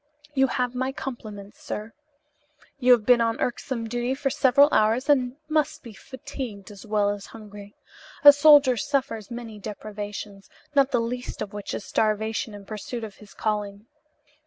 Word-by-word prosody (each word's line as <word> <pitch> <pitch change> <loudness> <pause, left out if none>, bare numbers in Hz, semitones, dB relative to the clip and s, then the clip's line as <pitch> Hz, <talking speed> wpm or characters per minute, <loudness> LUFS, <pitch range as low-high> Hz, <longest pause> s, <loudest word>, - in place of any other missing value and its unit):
You 270 -1 +3
have 250 -1 -1
my 260 +1 -1
compliments, 215 -7 -8
sir. 215 +1 -6 0.9
You 250 -1 +4
have 230 -4 +1
been 245 0 +5
on 230 -1 0
irksome 240 -1 -3
duty 240 +3 -2
for 275 0 -1
several 275 +2 +5
hours 220 +4 +2
and 260 -4 +2
must 310 0 0
be 230 -3 -10
fatigued 255 -5 -8
as 205 +1 -12
well 205 -1 +2
as 205 -1 -7
hungry. 205 -2 -12 0.5
A 290 0 +11
soldier 285 -3 +6
suffers 260 -6 -2
many 235 -3 -8
deprivations, 205 -1 -7 0.2
not 275 -2 +4
the 245 - +1
least 245 +2 -4
of 200 - -9
which 205 -1 -5
is - - -6
starvation 215 0 -1
in 200 -1 -11
pursuit 220 +3 -6
of 210 -3 -8
his 210 -2 -16
calling. 210 -1 -3
230 Hz, 160 wpm, -25 LUFS, 210-260 Hz, 0.9 s, A